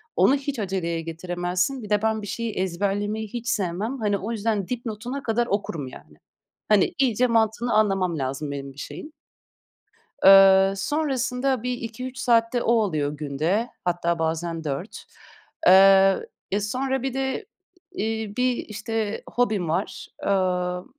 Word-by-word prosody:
onu 275 - +5
hiç 275 -3 -4
aceleye 180 -4 -2
getiremezsin. 175 - -2
Bir 210 - -8
de 210 0 +2
ben 220 -1 0
bir 205 - -7
şeyi 230 0 -3
ezberlemeyi 205 +4 -2
hiç 235 +2 -7
sevmem. 210 +5 -2
Hani, 205 -2 +1
o 215 +4 -5
yüzden 215 -3 -1
dipnotuna 245 +2 -5
kadar 235 +1 0
okurum, 170 -9 -2
yani. 75 -11 -13 0.5
Hani, 210 -3 +4
iyice 250 -1 +3
mantığını 230 +1 +1
anlamam 195 -6 +2
lazım 135 +2 -3
benim 140 -1 -6
bir - - -25
şeyin. 305 - -8 1.1
Eee, 195 0 +8
sonrasında 260 -1 -1
bir 250 0 -1
2-3 245 +2 -6
saat 230 -1 +2
de 240 - 0
o 235 - +2
oluyor 155 -10 +1
günde, 155 - -1 0.2
hatta 170 -1 0
bazen 165 0 -2
4. 150 +7 -5 0.6
Eee, 195 +1 +6 0.2
e, 200 - +1
sonra 260 +5 -2
bir 265 -2 -2
de 265 0 -2 0.5
i 365 - -4
iii, 220 -2 -3
bir, 250 -1 +2
işte, 215 0 -4
hobim 215 -9 0
var. 165 - -2 0.2
Emm, 180 -2 0
210 Hz, 145 wpm, -24 LUFS, 180-235 Hz, 1.1 s, Eee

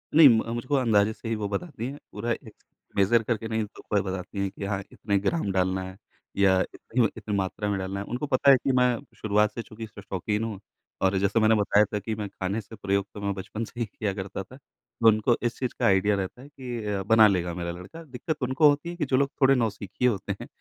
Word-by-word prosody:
नहीं, 155 -4 +10
म 115 0 +2
मुझको 125 +4 -1
अंदाज़े 110 -5 +3
से 115 - -9
ही 115 - 0
वो 100 - -1
बताती 115 - -4
है, 140 +2 -6
पूरा 115 +3 -3
एक 110 -2 -5 0.4
मेज़र 110 +4 +4
करके 110 -1 -2
नहीं 110 -1 -1 0.3
बताती 95 0 -1
है 95 - -1
कि 100 +1 -7
हाँ 100 -1 -1
इतने 100 -2 -1
ग्राम 105 - 0
डालना 95 0 0
है 95 +1 -9 0.4
या 95 -2 +5
इतनी 115 -1 0
इतनी 105 -1 -3
मात्रा 100 +2 -2
में 100 - 0
डालना 95 +1 -3
है, 100 - -4
उनको 125 +5 -3
पता 140 +2 +6
है 135 - +7
कि 135 - +2
मैं 125 -2 +3 0.2
शुरुआत 105 0 +2
से 115 - -4
चूँकि 110 0 -9
शो 105 -1 -12
शौकीन 105 +3 -2
हूँ 110 -4 -4 0.4
और 95 0 +3
जैसा 100 +4 +2
मैंने 110 +1 +5
बताया 105 0 +4
था 105 - 0
कि 110 +2 -4
मैं 105 -1 -4
खाने 100 +3 -3
से 110 +2 -12
प्रयोग 100 -1 0
तो 105 - -8
मैं 100 0 -1
बचपन 100 +4 -5
से 120 - -11
ही 115 - +1
किया 100 -1 -3
करता 95 0 -5
था। 130 - -15
तो 115 -3 -3
उनको 110 +2 +4
इस 120 - -1
चीज़ 125 -2 -2
का - - +1
आइडिया 100 +1 +4
रहता 100 +5 -4
है 140 - -12
कि 125 -6 -6
अ, 100 -2 -1
बना 110 0 +7
लेगा 90 -3 0
मेरा 85 -1 -3
लड़का 95 - -10
दिक्कत 155 +2 -5
उनको 130 +4 +5
होती 145 +4 0
है 175 - -5
कि 155 -4 -1
जो 130 -1 +2
लोग 140 0 +2
थोड़े 135 +1 +6
नौसिखिये 115 +1 0
होते 100 -5 -3
हैं - - -7
105 Hz, 240 wpm, -26 LUFS, 100-120 Hz, 0.4 s, नहीं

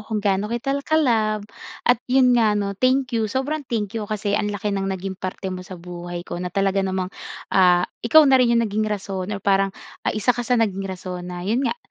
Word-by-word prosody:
kung 215 +1 -4
gaano 200 0 0
kita 235 +4 -2
ka-love 230 -9 +1 0.4
at, 245 -2 +4
yun 255 0 +5
nga, 220 -3 +3
'no, 200 -1 -1
thank 255 +4 +1
you, 225 -2 0
sobrang 265 +7 -1
thank 210 -4 -2
you 215 -2 -4
kasi 210 -1 -2
ang 205 0 +1
laki 205 0 -2
ng 195 -1 -1
naging 190 0 -3
parte 185 0 -4
mo 185 - -5
sa 185 0 -9
buhay 175 0 -7
ko 175 - -6
na 180 - -3
talaga 195 +1 +1
namang, 190 -1 -2 0.4
ah, 180 -2 +5 0.2
ikaw 310 +7 +6
na 265 -2 +5
rin 235 -1 +4
yung 235 - +3
naging 215 0 -1
rason 195 -2 -4
or 205 -1 -4
parang, 195 0 +3 0.4
ah, - - +1
isa 215 +4 +3
ka 245 - -4
sa 245 +1 +1
naging 195 -4 0
rason 185 -1 -6
na, 175 0 -6
yun 225 +6 +1
nga, 275 - 0
205 Hz, 220 wpm, -22 LUFS, 190-235 Hz, 0.4 s, ikaw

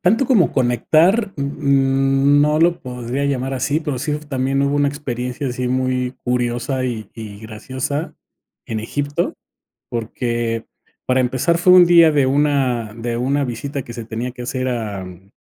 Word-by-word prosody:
Tanto 225 +9 +2
como 225 - +3
conectar, 165 - +2
uh, - - -6
mm, 135 0 +2
no 150 +1 +3
lo 170 +1 +3
podría 125 +2 -4
llamar 135 -1 -1
así, 140 +4 0
pero, 145 -6 -3
sí 150 +2 -2
también 135 0 0
hubo 140 +1 +1
una 145 0 +3
experiencia 130 -2 -4
así 125 0 -3
muy 130 0 0
curiosa, 125 +2 -1
y 115 -4 -4
y 105 -3 -8
graciosa 130 +7 -4 0.5
en 110 -1 -3
Egipto, 145 +6 -2 0.6
porque 115 0 -2 0.4
para 130 0 +2
empezar 130 +7 +1
fue 180 +2 +5
un 180 -1 +8
día 170 -2 +6
de 145 -2 +3
una 130 -5 +1
de 115 0 -3
una 140 +4 0
visita 135 +2 -4
que 120 - -9
se 115 -1 -7
tenía 115 +3 -4
que 125 0 -8
hacer 130 +1 -2
a, 110 -6 -3
mm 90 +2 -13
130 Hz, 165 wpm, -19 LUFS, 120-145 Hz, 0.6 s, un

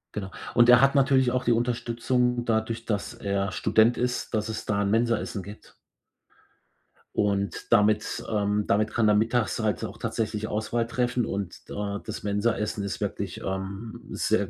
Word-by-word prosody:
Genau. 95 -2 -4 0.2
Und 120 0 +5
er 125 0 +9
hat 135 +1 +4
natürlich 135 -2 +4
auch 125 0 0
die 120 - +2
Unterstützung, 120 +1 0
dadurch, 115 0 -1
dass 105 -3 -2
er 100 0 -2
Student 115 +2 +3
ist, 125 0 -2
dass 110 0 0
es 110 -1 -5
da 100 -1 0
'n 100 - +1
Mensa-Essen 115 -3 0
gibt. 105 +2 -12 1.4
Und 100 -1 -1
damit 105 -1 +2
ähm, 105 -1 0
damit 110 +2 +2
kann 115 -1 +2
er 105 - +5
mittags 115 +2 +1
halt 110 -3 0
auch - - -8
tatsächlich 110 -1 -2
Auswahl 110 +2 -1
treffen. 125 0 0
Und, 100 -4 -5
da 100 0 -3
das - - -6
Mensaessen 105 0 0
ist 100 - -4
wirklich, - - -3
ähm, 95 +3 -5
sehr - - 0
110 Hz, 160 wpm, -26 LUFS, 105-120 Hz, 1.4 s, er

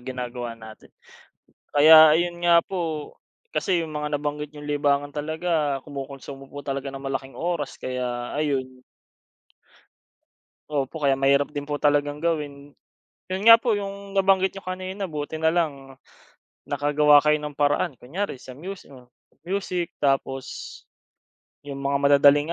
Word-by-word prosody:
ginagawa 125 -2 -6
natin. 110 -1 -13 0.8
Kaya 155 +1 +8
ayun 175 +1 -1
nga 170 -1 +6
po 165 -5 -4 0.4
kasi 185 -3 +1
'yung 155 -2 -7
mga 150 0 -2
nabanggit 150 0 -4
niyong 145 -1 -10
libangan 145 0 0
talaga 155 -1 -1
kumukonsumo 135 -1 -8
po 145 0 -9
talaga 140 0 -3
ng 135 0 -8
malaking 135 0 -5
oras 165 -5 -3
kaya 125 -1 -4
ayun. 130 -4 -2 1.9
Opo, 145 +1 -3
kaya 135 -1 +3
mahirap 140 +1 +3
din 145 -1 -5
po 145 - -3
talagang 145 0 +1
gawin, 145 -4 -3 0.6
'yon 190 +1 -2
nga 230 - +12
po 230 0 0
'yong 200 0 -7
nabanggit 190 -1 +3
niyo 195 - -9
kanina 185 +2 -5
buti 155 -1 -5
na 160 - +4
lang 140 -6 -2 0.7
nakagawa 145 +1 +4
kayo 150 +1 +3
ng 150 -1 -6
paraan 145 0 +1
kunyari 175 +12 -4
sa 130 0 -11
musi 190 +5 -8
hmm, 130 -3 -14 0.4
music. 185 -2 -3
Tapos 135 -2 0 1.2
'yung 140 -1 -7
mga 140 0 0
madadaling 145 +2 +5
145 Hz, 135 wpm, -24 LUFS, 140-165 Hz, 1.9 s, nga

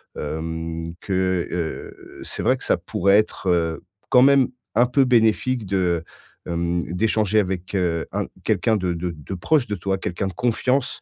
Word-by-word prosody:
hem, 80 +2 -4
que, 95 -2 0
heu, 85 -3 -6
c'est - - -4
vrai - - +4
que - - -10
ça - - +2
pourrait 100 +2 +2
être, 105 -2 -1
heu, 85 -2 0 0.3
quand 125 - +6
même 135 -1 +5 0.3
un 120 +2 +5
peu 130 +2 +3
bénéfique 120 0 +2
de, 90 -4 0 0.4
hem, 85 0 -1
d'échanger 110 +1 +2
avec, 95 -2 -2
heu, 85 -3 0
un - - -2 0.2
quelqu'un 110 - +2
de 90 -3 -1
de 85 +1 -3
de 75 +2 -8
proche 135 - +1
de 105 - -3
toi, 95 +1 -1
quelqu'un 95 +1 -3
de 95 - -5
confiance, 125 +3 0
95 Hz, 170 wpm, -22 LUFS, 85-110 Hz, 0.4 s, quand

